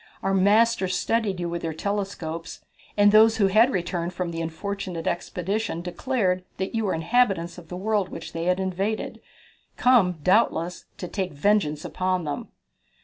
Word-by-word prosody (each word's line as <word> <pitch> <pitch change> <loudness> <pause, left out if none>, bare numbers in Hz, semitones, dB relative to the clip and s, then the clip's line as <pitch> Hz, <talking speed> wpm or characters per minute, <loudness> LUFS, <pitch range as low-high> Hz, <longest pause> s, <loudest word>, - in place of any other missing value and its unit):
Our 195 - +1
masters 200 0 +3
studied 220 -5 0
you 175 - -2
with 170 0 -3
their 160 -1 -3
telescopes, 180 -4 -4 0.3
and 205 0 +6
those 220 +1 +6
who 205 - +4
had 215 +6 +5
returned 175 -3 -2
from 180 -2 -2
the 165 0 -4
unfortunate 175 +1 -4
expedition 180 +2 -2
declared 185 -1 -1
that 190 +1 -3
you 225 -1 0
were 190 - 0
inhabitants 175 -1 +1
of 170 - -15
the 180 - -6
world 205 0 0
which 165 - -8
they 165 0 -3
had 180 +1 +2
invaded, 190 +3 -2 0.6
come, 235 -8 +4
doubtless, 180 -3 +2
to 180 - -5
take 190 -2 -3
vengeance 155 -2 +1
upon 185 -1 -1
them." 145 -2 -4
185 Hz, 160 wpm, -25 LUFS, 170-210 Hz, 0.6 s, and